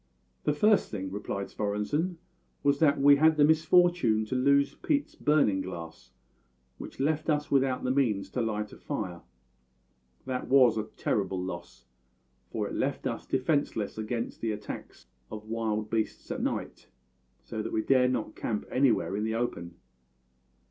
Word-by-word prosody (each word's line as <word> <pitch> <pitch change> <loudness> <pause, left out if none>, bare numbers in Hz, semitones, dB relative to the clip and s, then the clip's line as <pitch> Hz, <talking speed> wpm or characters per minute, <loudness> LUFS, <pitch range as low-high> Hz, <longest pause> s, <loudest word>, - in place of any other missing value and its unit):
"The 150 - +3
first 210 +7 +3
thing," 95 -2 -5
replied 100 -1 -4
Svorenssen, 105 - -1 0.5
"was 140 0 +3
that 150 -3 +4
we 140 +1 +7
had 160 +1 +4
the 145 - +6
misfortune 160 -8 +3
to 120 - -3
lose 140 +2 +3
Pete's 290 -1 -1
burning 145 -11 +2
glass, 85 -8 -8 0.7
which - - -9
left 155 +3 0
us 150 -1 0
without 135 -2 +2
the 130 - +1
means 120 -8 +1
to 125 - -1
light 105 -2 -2
a - - -13
fire. 95 - -4 1.0
That 130 -1 -3
was 130 -4 +5
a 110 -1 -2
terrible 95 -2 -1
loss, 85 -8 -7 0.6
for - - -2
it - - -7
left - - -2
us - - -3
defenceless 130 -6 -1
against 115 +2 -4
the 115 - 0
attacks 105 -1 -8 0.2
of 105 0 -8
wild 110 -1 -2
beasts 110 -1 -2
at - - -3
night, - - -4 0.5
so 110 - -5
that - - -5
we 110 - 0
dared 130 -2 +4
not 120 -4 -3
camp 105 -3 -3
anywhere 125 -6 +2
in 105 - -1
the 110 0 -1
open. 85 -8 -3
120 Hz, 155 wpm, -29 LUFS, 105-140 Hz, 1.0 s, we